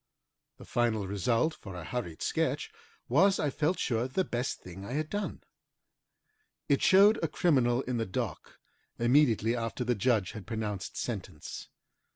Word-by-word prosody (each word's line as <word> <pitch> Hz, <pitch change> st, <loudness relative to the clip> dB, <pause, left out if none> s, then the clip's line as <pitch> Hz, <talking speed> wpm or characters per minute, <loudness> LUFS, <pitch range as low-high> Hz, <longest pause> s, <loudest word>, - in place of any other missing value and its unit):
The -, -, -12 dB
final 110 Hz, -4 st, 0 dB
result, 115 Hz, -, +1 dB
for 95 Hz, -10 st, -10 dB
a 90 Hz, -, -6 dB
hurried 90 Hz, -4 st, -4 dB
sketch, -, -, -1 dB, 0.4 s
was, 190 Hz, +10 st, +4 dB
I 145 Hz, -, +1 dB
felt 160 Hz, +6 st, 0 dB
sure, 120 Hz, -1 st, 0 dB
the 185 Hz, +9 st, 0 dB
best 120 Hz, -5 st, -2 dB
thing 90 Hz, +2 st, -10 dB
I 100 Hz, -, -6 dB
had 155 Hz, +1 st, -2 dB
done. 205 Hz, 0 st, -3 dB, 1.2 s
It -, -, +2 dB
showed 200 Hz, +3 st, +6 dB
a -, -, +3 dB
criminal 130 Hz, -8 st, +2 dB
in 125 Hz, -1 st, -2 dB
the 115 Hz, -, -1 dB
dock 95 Hz, -, -4 dB, 0.4 s
immediately 120 Hz, -2 st, +3 dB
after 115 Hz, +1 st, -3 dB
the 120 Hz, 0 st, +1 dB
judge 110 Hz, -4 st, +1 dB
had 105 Hz, -3 st, -9 dB
pronounced 105 Hz, -4 st, -4 dB
sentence. 95 Hz, -9 st, -5 dB
120 Hz, 155 wpm, -30 LUFS, 105-140 Hz, 1.2 s, showed